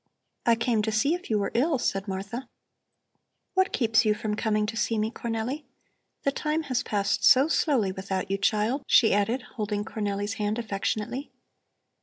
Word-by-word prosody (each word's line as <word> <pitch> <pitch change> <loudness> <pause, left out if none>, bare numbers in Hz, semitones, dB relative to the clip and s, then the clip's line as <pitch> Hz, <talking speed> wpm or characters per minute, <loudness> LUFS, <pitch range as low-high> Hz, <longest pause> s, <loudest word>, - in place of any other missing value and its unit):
"I 235 - +6
came 230 -1 +1
to 220 +1 -1
see 220 +9 +2
if 355 +1 -5
you 215 - +2
were 200 -1 -1
ill," 280 +5 +2
said 195 -4 -1
Martha. 200 +6 -5 1.0
"What 375 0 +2
keeps 225 -3 +3
you 215 -1 +2
from 210 0 -3
coming 215 -1 +1
to 220 +2 -4
see 225 0 0
me, 215 +1 0
Cornelli? 235 +6 -3 0.6
The 275 - +2
time 305 +3 -1
has 255 -4 -1
passed 200 -1 -1
so 265 +3 +7
slowly 265 - +2
without 190 0 -3
you, 195 - 0
child," 215 +7 +1
she 225 - +5
added, 225 +5 +1
holding 210 -1 -2
Cornelli's 205 -1 -2
hand 210 +1 0
affectionately. 220 +4 -3
220 Hz, 170 wpm, -27 LUFS, 205-255 Hz, 1.0 s, so